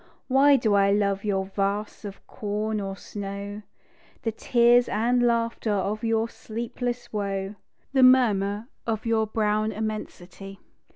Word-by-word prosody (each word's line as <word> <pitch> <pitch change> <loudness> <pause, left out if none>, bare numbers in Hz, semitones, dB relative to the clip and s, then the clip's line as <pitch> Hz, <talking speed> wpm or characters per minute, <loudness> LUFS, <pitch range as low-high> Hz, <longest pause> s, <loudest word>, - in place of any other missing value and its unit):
Why 275 +2 +5
do 225 -5 +1
I 200 0 +4
love 200 -1 +1
your 195 -2 0
vasts 200 +2 -3
of 200 -1 -9
corn 210 +1 -3
or 195 -1 -4
snow, 200 +1 -6 0.6
The 225 - 0
tears 240 +2 +3
and 240 +3 +1
laughter 230 -1 0
of 205 +2 -1
your 225 0 +1
sleepless 235 +2 -5
woe, 195 -1 -2 0.4
The 265 - +4
murmur 220 -5 +4 0.2
of 220 -1 -2
your 225 -1 +1
brown 215 0 0
immensity? 195 -3 -6
215 Hz, 130 wpm, -25 LUFS, 200-230 Hz, 0.6 s, Why